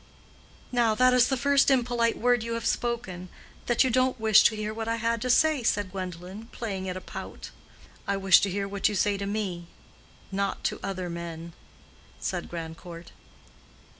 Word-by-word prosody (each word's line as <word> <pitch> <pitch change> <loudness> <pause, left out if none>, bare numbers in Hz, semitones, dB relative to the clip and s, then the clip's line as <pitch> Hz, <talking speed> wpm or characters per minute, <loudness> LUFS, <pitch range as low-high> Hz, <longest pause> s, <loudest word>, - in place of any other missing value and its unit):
"Now 235 -3 +2
that 255 +2 +4
is 250 -1 +5
the 265 - 0
first 280 +1 +3
impolite 240 -3 +2
word 245 0 +2
you 230 +1 -3
have 230 -1 -4
spoken—that 235 0 -2
you 260 - +1
don't 255 +1 +2
wish 220 -1 +6
to 220 - +4
hear 215 0 -3
what 225 0 -5
I 230 - 0
had 230 0 -1
to 250 - -2
say," 310 +2 +4
said 205 -4 0
Gwendolen, 185 +3 -7
playing 195 -6 -5
at 180 - -4
a - - -7
pout. - - -8 0.6
"I 200 - 0
wish 195 -1 +6
to 200 - +1
hear 200 +1 -2
what 200 +1 0
you 210 - -3
say 200 +1 +2
to 200 - -3
me—not 195 0 -5
to - - -1
other 185 -2 -4
men," 170 -1 -7 0.7
said - - -3
Grandcourt. 165 0 -8
215 Hz, 170 wpm, -27 LUFS, 185-235 Hz, 0.7 s, wish